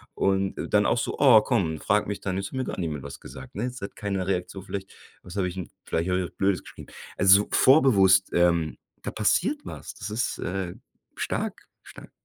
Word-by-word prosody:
Und 95 0 +1 0.2
dann 105 0 +5
auch - - +2
so: - - -3
„Oh, 125 -7 +8
komm”, 115 -9 +1
und 80 - -6
frag 105 +1 +1
mich 105 - -4
dann, 95 -1 -2
„jetzt 95 0 -3
hat - - -14
mir 130 - -1
gar - - -5
niemand 75 -5 -3
was 70 - -8
gesagt.”, 65 +4 -11
ne? 105 - -3
Es 125 -2 -6
hat 100 - -7
keine 100 -3 -2
Reaktion. 90 0 -3
Vielleicht 95 -2 -6 0.3
was 90 +2 -10
hab 95 - +1
ich 90 +1 -4
'n 90 - -5 0.2
vielleicht 85 +3 -1
hab 90 - +2
ich 95 - 0
was 85 - -9
Blödes 95 -2 +1
geschrieben. - - -12 0.3
Also 95 +2 +7
so - - -12
vorbewusst, 100 -9 +5
ähm, 85 -3 +2 0.3
da - - -4
passiert 200 - +1
was. - - -8
Das 105 0 -6
ist, 115 +3 -1
äh, 90 -1 -3 0.4
stark, - - -3 0.2
stark. - - -13
95 Hz, 220 wpm, -26 LUFS, 90-105 Hz, 0.4 s, Oh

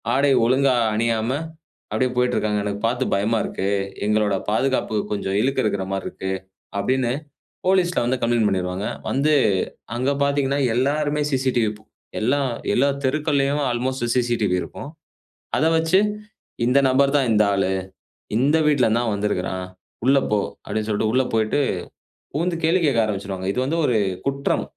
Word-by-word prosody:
ஆடை 140 +1 +3
ஒழுங்கா 130 +1 +3 0.2
அணியாம 115 +1 0 0.6
அப்டியே 130 -1 +1
போய்ட்டு 125 0 +2
இருக்காங்க. 105 -1 0
எனக்கு 100 0 -3
பார்த்து 125 +2 0
பயமா 110 +3 +1
இருக்கு. 95 - -3 0.4
எங்களோட 105 -1 +2
பாதுகாப்புக்கு 110 -2 0
கொஞ்சம் 100 -1 -2
இழுக்கு 135 +2 +1
இருக்குற 100 -3 -1
மாரி 95 - -3
இருக்கு." 95 0 -5 0.5
அப்டின்னு 125 +2 +1 0.6
போலீஸ்ல 185 -2 +2
வந்து 125 +1 0
கம்ப்ளெயிண்ட் 115 -2 +2
பண்ணிடுவாங்க. 90 +1 -2 0.2
வந்து 150 +3 +2 0.6
அங்கே 130 +3 +1
பார்த்தீங்கன்னா, 140 0 +1 0.2
எல்லாருமே 145 +3 +1
சிசிடிவி 125 -5 +1 0.5
எல்லாம் 135 +3 +1 0.3
எல்லா 140 +3 +3 0.2
தெருக்கள்லயும் 145 0 +1
அல்மோஸ்ட் 125 0 -2
சிசிடிவி 120 -7 +1
இருக்கும். 140 - -8 0.7
அத 155 - +2
வச்சு 165 +4 +3 0.7
இந்த 130 +3 +4
நபர் 140 +2 +3
தான் 135 -4 +1
இந்த 105 0 +4
ஆளு. 95 -1 +1 0.7
இந்த 145 +6 +3
வீட்டல 145 -5 +3
இருந்துதான் 115 0 +1
வந்திருக்குறான். 95 -2 -2 0.4
"உள்ள 135 +1 +5
போ" 105 - +3 0.2
அப்டின்னு 110 +1 -3
சொல்ட்டு 110 +1 +1
உள்ள 130 0 +3
போயிட்டு 110 +6 +1 0.7
புகுந்து 170 +4 0
கேள்வி 165 +3 +3
கேட்க 135 -6 +2
ஆரம்பிச்சுடுவாங்க. 95 -2 -4
இது 125 - -2
வந்து 150 +6 -1
ஒரு 120 -3 +2 0.3
குற்றம். 140 0 0
125 Hz, 140 wpm, -22 LUFS, 105-140 Hz, 0.7 s, உள்ள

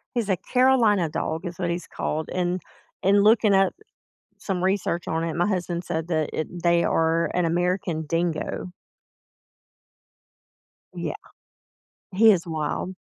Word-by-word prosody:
He's 230 -4 -1
a 190 - +2
Carolina 230 -6 +3
dog 160 +3 -3
is 175 -1 -6
what 175 -2 -2
he's 170 +1 -3
called, 155 +1 -3
and 180 0 -1 0.4
and 200 +1 +4
looking 215 -1 +5
at 195 -1 +3 0.7
some 185 -3 -3
research 185 -3 0
on 160 +1 -1
it, 165 -1 -3
my 175 +1 +1
husband 175 -3 -2
said 165 -1 -3
that 155 -3 0
it 170 +2 -4
they 170 0 +3
are 165 +1 +1
an 180 -1 +2
American 175 -1 0
Dingo. 165 +2 -2 2.2
Yeah. - - -4 1.0
He 215 +3 +6
is 175 -4 +1
wild. 160 +3 -3
175 Hz, 135 wpm, -24 LUFS, 165-195 Hz, 2.2 s, He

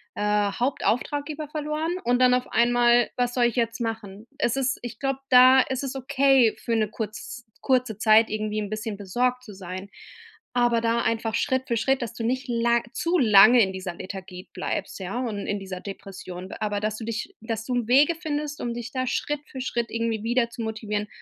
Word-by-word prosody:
äh, 210 -1 +1
Hauptauftraggeber 285 +4 -1
verloren 305 +2 -2
und 245 +1 +2
dann 250 -1 +5
auf 250 0 0
einmal: 240 +1 +4
„Was 245 -1 0
soll 245 -2 +3
ich 235 - 0
jetzt 230 -1 -1
machen?“ 220 -2 -5
Es 235 - +1
ist 265 0 0
ich 240 -2 -7
glaube, 270 -1 -1
da 255 +1 +8
ist 265 +1 -3
es 270 -1 -4
okay 265 -2 +3
für 230 - -2
'ne 215 -2 +1
kurz 220 +3 -7 0.2
kurze 250 -5 +1
Zeit 220 0 +5
irgendwie 215 0 -2
'n 205 -1 -4
bisschen 215 -1 -4
besorgt 245 +6 -1
zu 215 -4 -11
sein. 185 +1 -8 0.6
Aber 240 -1 +2
da 230 0 +1
einfach 225 -1 -1
Schritt 260 +1 0
für 235 - 0
Schritt, 265 +3 +1
dass 235 -2 -4
du 230 - -6
nicht 255 +3 -1
la 235 0 +2
zu 340 +2 0
lange 220 0 +7
in 190 - +2
dieser 185 -1 -5
Lethargie 185 0 -8
bleibst, 195 - -4
ja, 190 +5 -4
und 220 -5 -3
in 205 - -1
dieser 190 -1 -7
Depression 190 -2 -8
b - - -7
Aber 210 -1 -1
dass 215 0 -2
du 225 - -7
dich 225 -1 -4
dass 225 -1 -4
du 250 - -3
im 240 -2 -1
Wege 285 +7 +5
findest, 300 -3 -4
um 240 - -2
dich 235 0 -6
da 255 -1 -2
Schritt 295 +3 -1
für 260 - -6
Schritt 235 -2 -2
irgendwie 230 -2 -2
wieder 235 +1 +1
zu 235 - -8
motivieren 210 -1 -3
235 Hz, 205 wpm, -25 LUFS, 215-255 Hz, 0.6 s, da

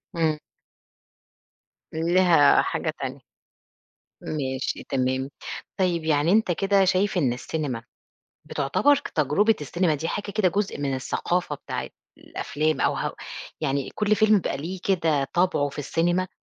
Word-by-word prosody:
إمم. 160 -2 +1 1.6
ليها 170 -2 +5
حاجة - - -2
تانية. - - -5 1.0
ماشي 130 -3 -3
تمام، 130 0 0 0.5
طيّب 175 -3 +1
يعني 155 +2 +2
أنت 215 -3 +3
كده 195 +2 +3
شايف 190 +1 +2
إن 130 -7 +2
السينما 125 -3 -4 0.7
بتُعتبر 145 - +3
ك - - -7
تجربة 180 +10 +2
السينيما 165 +3 0
دي 160 +3 -3
حاجة 205 0 -3
كده 200 -3 +2
جزء 200 -1 -2
من 140 -2 -1
الثقافة 150 +5 -1
بتاعة - - -5 0.3
الأفلام 155 +2 -2
أو - - +2
هو - - -2 0.5
يعني 140 -3 -1
كل 210 0 +2
فيلم 215 +1 +4
بيبقى 195 - +1
ليه 175 +6 -5
كده 160 -7 +2
طبعُه 175 -5 +2
في 140 - -11
السينما، 175 +5 0
165 Hz, 130 wpm, -25 LUFS, 145-185 Hz, 1.6 s, ليها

